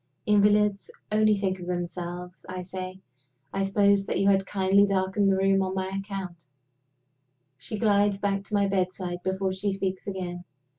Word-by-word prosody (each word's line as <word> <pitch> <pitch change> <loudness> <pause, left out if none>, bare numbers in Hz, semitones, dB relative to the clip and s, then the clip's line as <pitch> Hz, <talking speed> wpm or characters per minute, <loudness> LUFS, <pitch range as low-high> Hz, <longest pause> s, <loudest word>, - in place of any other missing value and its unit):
"Invalids 210 -1 +3 0.2
only 215 0 +4
think 190 -1 -1
of 175 - -8
themselves," 175 0 -5
I 185 0 -5
say. 185 +1 -7 0.5
"I 195 - -1
supposed 200 0 +3
that - - -1
you 195 - +4
had 195 -1 +2
kindly 195 +1 +3
darkened 195 +1 +1
the 190 - +2
room 195 0 +3
on 190 0 -2
my 190 0 -2
account." 195 -4 -6 1.1
She 135 +11 -5
glides 205 -2 +3
back 200 0 -1
to 210 - -3
my 200 -1 +3
bedside 185 -2 -2
before 190 +1 -1
she 195 +2 -1
speaks 190 -1 -3
again. 180 -2 -4
195 Hz, 160 wpm, -27 LUFS, 185-200 Hz, 1.1 s, only